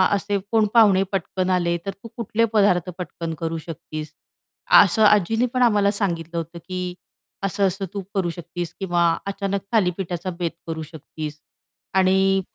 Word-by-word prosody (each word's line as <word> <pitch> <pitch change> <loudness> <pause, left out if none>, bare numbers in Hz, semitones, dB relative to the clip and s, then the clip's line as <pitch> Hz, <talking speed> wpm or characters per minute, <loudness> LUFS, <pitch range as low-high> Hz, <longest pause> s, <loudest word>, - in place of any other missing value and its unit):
असे 200 0 -1
कोण 220 -1 +4
पाहुणे 205 -5 +6
पटकन 185 -1 -1
आले, 175 -2 +1
तर 195 - -2
तू 200 +4 -13
कुठले 230 0 +1
पदार्थ 185 -4 +3
पटकन 170 -2 -5
करू 165 0 -2
शकतीस, 155 -1 -7 0.7
असं 210 +3 +2
आजींनी 210 +3 +4
पण 255 - +1
आम्हाला 205 -4 +4
सांगितलं 170 -5 -1
होतं, 165 +1 -5
की 180 +1 -5 0.5
असं 195 0 +2
असं 195 +2 -3
तू 200 - -3
करू 180 -3 +1
शकतीस. 170 0 -6
किंवा 175 -3 0 0.3
अचानक 200 0 -2
थालीपीठाचा 180 -3 0
बेत 170 -2 -1 0.2
करू 160 -1 -4
शकतीस. 155 -1 -8 0.5
आणि 190 0 +3
185 Hz, 150 wpm, -23 LUFS, 170-200 Hz, 0.7 s, पाहुणे